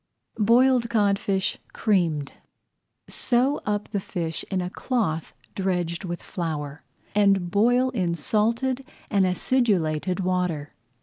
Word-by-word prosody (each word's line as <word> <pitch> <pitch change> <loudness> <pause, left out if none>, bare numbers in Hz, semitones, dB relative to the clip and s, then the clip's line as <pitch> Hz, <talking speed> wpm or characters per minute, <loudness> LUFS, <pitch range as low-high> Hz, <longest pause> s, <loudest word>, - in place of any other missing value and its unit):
BOILED 240 +2 +4
CODFISH 200 -3 +1
CREAMED 165 -9 +1 0.7
Sew 260 +4 +1
up 210 0 -1
the 205 - -1
fish 170 -4 -4
in 190 - 0
a 180 0 -3
cloth 195 - -1 0.2
dredged 180 -3 -1
with 175 -1 -5
flour, 155 -5 -4 0.3
and 195 -3 +3
boil 245 +6 +3
in 180 -8 0
salted 230 - 0 0.3
and 195 -3 +3
acidulated 180 -5 +1
water. 180 -5 -1
195 Hz, 110 wpm, -25 LUFS, 170-230 Hz, 0.7 s, BOILED